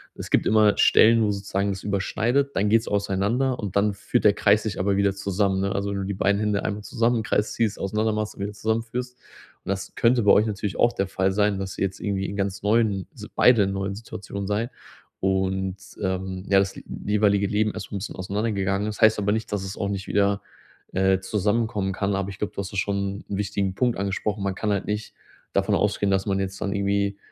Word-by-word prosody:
es - - -7
gibt - - +3
immer 105 -1 +4
Stellen, 115 0 +6
wo 105 - +2
sozusagen 100 0 -1
es 95 0 -6
überschneidet, 115 +7 0
dann 105 +1 +2
geht's 115 +2 +3
auseinander 105 +6 0
und 100 -4 -5
dann 100 0 +3
führt 120 +4 -1
der 105 - +7
Kreis 105 +1 +3
sich 110 -4 -3
aber 100 +1 +1
wieder 100 -1 +2
zusammen, 100 0 0
ne? 100 0 0
Also, 100 0 -1
wenn 100 - -2
du - - -2
die 100 - -2
beiden 100 +1 +2
Hände 105 -1 0
einmal 105 0 -3
zusammen 115 +3 +1
im 110 - -1
Kreis 105 0 0
ziehst, 110 -3 0
auseinander 110 +3 0
machst 110 0 -3
und - - -9
wieder 105 +1 -4
zusammenführst. 115 +4 -3 0.5
Und - - -7
das 100 -1 -3
könnte 120 -1 +3
bei 100 - +6
euch 105 - +5
natürlich 105 -2 -3
auch 120 - +3
der 95 - -1
Fall 95 0 0
sein, 105 0 +1
dass 95 -1 -5
jetzt 95 -1 -2
irgendwie 100 -2 -2
in 100 - -5
ganz 100 -1 -2
neuen 105 -3 +2
Si - - -9
beide 120 -4 +6
in 95 - -1
neuen 95 0 -3
Situationen 100 -2 -7
seid 110 +5 -1 0.5
und, 95 0 0 0.2
ähm, 95 -1 -3
ja, 100 -1 +6
das 95 0 -1 0.3
jeweilige 100 -1 +2
Leben 105 +1 +1
erst 105 -4 -7
mal - - -4
'n - - -4
bisschen 100 - -6
auseinandergegangen 100 +1 -1
ist. 105 - -6
Das - - -11
heißt 110 -1 +6
aber 105 0 +1
nicht, 110 +1 -2
dass 100 - -1
es 95 +1 -6
auch 100 - -1
nicht 100 -1 -4
wieder, 100 0 +2 0.5
äh, 95 0 +3
zusammenkommen 105 0 0
kann, 100 +1 -1
aber 95 -1 -2
ich 95 - -9
glaube, 105 - -2
du - - -7
hast 100 -1 -4
ja - - -4
schon 100 0 -1
'n 100 - -2
wichtigen 100 -1 -1
Punkt 125 0 +1
angesprochen. 100 +1 -2
Man 100 -1 0
kann 105 - -2
halt 100 -1 0
nicht 105 +1 -4 0.4
davon - - +2
ausgehen, 100 -1 +1
dass 95 0 +1
man 95 -1 0
jetzt 95 0 -4
dann 100 -1 -1
irgendwie 100 0 0
100 Hz, 230 wpm, -24 LUFS, 95-105 Hz, 0.5 s, der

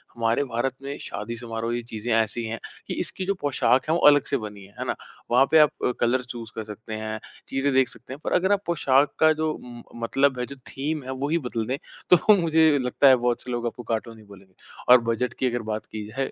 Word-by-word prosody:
हमारे 115 +3 +1
भारत 125 +1 -2
में 140 +1 -5
शादी-समारोह 115 +1 -4
ये 120 - -2
चीज़ें 110 +2 -3
ऐसी 115 +1 0
हैं 110 0 -4 0.3
कि, - - -3
इसकी 190 - -2
जो 200 - +1
पोशाक 130 -3 +2
हैं, 160 - +4
वो - - +1
अलग 145 -1 +6
से - - +4
बनी 105 -1 -8
हैं, 100 - -19
है - - -3
ना? - - 0 0.4
वहाँ 125 +3 +6
पे 160 - +7
आप 150 -1 +7 0.2
अ, - - +2
कलर 120 +2 +2
चूज़ 120 -3 -8
कर 110 - -4
सकते 110 +1 -9
हैं, 110 0 -4 0.3
चीज़ें 135 +1 0
देख 130 -1 +4
सकते 130 - -9
हैं 135 - -9
पर - - -2
अगर 190 +2 +2
आप 200 -1 +3
पोशाक 145 -4 +2
का 155 0 +6
जो 155 0 -1
उम, 120 -3 -10 0.2
मतलब 135 +2 +2
है, 125 - -1
जो 140 - -9
थीम 150 +2 -3
है 130 - -6
वही 155 +4 +1
बदल 115 -2 -2
दें 130 +2 -1 0.3
तो 205 +4 +6
मुझे 160 -2 +4
लगता 125 +2 +3
है 130 - +8
बहुत 120 -1 0
से 125 - -7
लोग 120 -1 -2
आपको 120 +1 -6
कार्टून 115 0 -3
हीं 110 - -16
बोलेंगे। 95 -2 -16 0.4
और 125 - +7
बजट 120 +2 -1
की 130 - +2
अगर 120 0 -2
बात 110 - -5
की 105 -1 -7
जाए 135 +5 -3
125 Hz, 245 wpm, -25 LUFS, 115-140 Hz, 0.4 s, है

